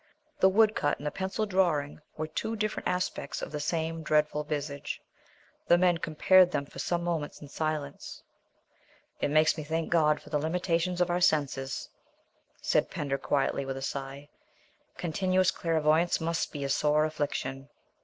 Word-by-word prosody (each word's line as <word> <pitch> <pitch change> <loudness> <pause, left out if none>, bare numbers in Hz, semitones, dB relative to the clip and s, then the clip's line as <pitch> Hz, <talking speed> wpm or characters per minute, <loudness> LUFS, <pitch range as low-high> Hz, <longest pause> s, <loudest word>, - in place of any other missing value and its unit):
The 190 - +6
woodcut 210 -7 +3
and 145 - -10
the 150 - -1
pencil 190 +3 -2
drawing 175 -8 +1 0.2
were 155 - -2
two 220 +8 -3
different 215 0 -2
aspects 180 0 -2
of - - -5
the 150 - -3
same 165 +2 -2
dreadful 150 -1 +1
visage. 145 -1 -4 0.7
The 175 - +6
men 175 -1 +3
compared 180 +4 +5
them 145 -5 -2
for - - -12
some 175 -1 -1
moments 165 -4 -2
in 145 - -10
silence. 155 -2 -4 1.0
"It - - 0
makes 155 +2 +3
me - - -4
thank 160 +2 -2
God 150 -3 +3
for 150 - -15
the 150 - +1
limitations 175 +2 0
of 175 0 +2
our 175 +1 0
senses," 140 -5 +1 0.8
said - - +2
Pender 140 -1 -2
quietly, 140 0 0
with 135 0 -4
a 135 - -6
sigh; 140 +1 -5 0.7
"continuous 185 +2 +1
clairvoyance 160 +1 +2
must 165 0 -1
be 145 -2 -5
a 140 - -2
sore 150 +2 +3
affliction." 140 -3 -3
155 Hz, 160 wpm, -29 LUFS, 145-175 Hz, 1.0 s, The